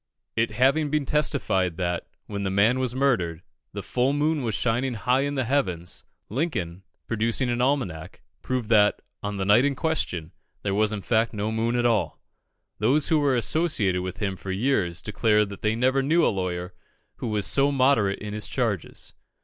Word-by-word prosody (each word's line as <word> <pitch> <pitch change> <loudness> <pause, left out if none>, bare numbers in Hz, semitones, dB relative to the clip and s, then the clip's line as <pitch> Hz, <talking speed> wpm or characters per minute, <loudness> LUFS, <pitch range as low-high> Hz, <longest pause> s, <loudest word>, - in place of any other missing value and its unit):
It 115 +1 +1
having 135 +7 +2
been 150 -1 0
testified 95 - +1
that, 90 -1 -2 0.2
when 100 -1 -5
the 95 - -1
man 105 +7 +3
was 125 -1 -1
murdered, 95 -12 0 0.3
the - - -6
full 130 +2 0
moon 150 +1 +1
was 115 -4 -1
shining 120 +4 0
high 125 +4 +1
in 145 +1 -1
the 130 - 0
heavens, 90 - -2 0.2
Lincoln, 100 - -3 0.2
producing 115 +3 0
an 120 0 -1
almanac, 125 - -2 0.2
proved 130 -3 -2
that, 105 -2 +4 0.2
on 105 0 -4
the 95 - -2
night 105 +5 +5
in 140 0 +1
question, 95 - -2 0.3
there 100 - -1
was 105 +1 +2
in 105 -3 -4
fact 115 0 +1
no 105 +1 -2
moon 115 +2 0
at 120 0 +1
all. 115 -4 +1 0.6
Those 145 +3 +2
who 160 - +4
were 140 -3 +2
associated 115 - +1
with 90 0 -5
him 100 -2 -2
for 95 +2 -9
years 95 -5 0
declare 105 0 +2
that 100 -1 -10
they 110 +1 +1
never 130 +3 +2
knew 160 +5 +3
a - - +2
lawyer 90 -1 -3 0.4
who - - -4
was 105 -2 -1
so 140 +1 +3
moderate 130 -7 +2
in 105 -1 -7
his 105 0 0
charges. 110 - -3
115 Hz, 185 wpm, -25 LUFS, 100-135 Hz, 0.6 s, night